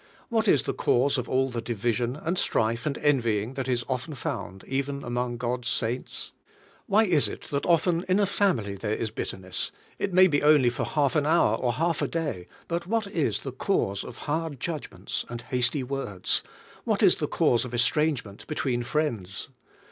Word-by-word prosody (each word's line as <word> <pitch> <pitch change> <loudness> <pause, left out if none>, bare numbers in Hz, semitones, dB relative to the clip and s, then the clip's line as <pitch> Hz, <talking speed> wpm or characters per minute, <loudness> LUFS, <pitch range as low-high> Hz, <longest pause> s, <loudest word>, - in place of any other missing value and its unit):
What 225 -1 +1
is 145 - +5
the - - -2
cause 135 +2 +2
of 125 - -5
all 130 +1 +2
the 120 -1 -3
division, 120 +2 -1
and 165 +4 -2
strife, 115 -6 +1
and 145 - -1
envying, 120 -6 +1
that 135 -1 -3
is 120 -2 0
often 130 +3 -3
found 95 -6 -5
even 140 +1 -2
among 120 0 -2
God's 120 0 -2
saints? 120 +2 -2 0.6
Why 215 0 +5
is 170 -9 +3
it - - -7
that 140 -1 -1
often 170 0 +3
in 185 +2 +4
a 205 - +4
family 180 - +1
there 105 +2 -2
is 110 - -3
bitterness 95 -4 -4
— - - -30
it 200 - -1
may 185 +1 +7
be 150 -6 +2
only 145 -5 +5
for - - -2
half 145 -2 +1
an 150 -1 +2
hour, 160 -9 +4
or 120 0 0
half 165 +3 0
a - - +1
day; 150 - -3 0.2
but 170 0 -2
what 225 +1 +1
is 175 -6 -1
the 135 - -4
cause 120 - 0
of 125 - -9
hard 155 -2 -2
judgments 155 +2 -4
and 120 0 -6
hasty 125 +2 0
words? 125 -8 -1 0.5
W^hat - - +2
is - - +6
the - - -1
cause 120 - +2
of 125 - -6
estrangement 120 -4 0
between 130 -5 -1
friends? 120 - -2
130 Hz, 190 wpm, -27 LUFS, 120-155 Hz, 0.6 s, may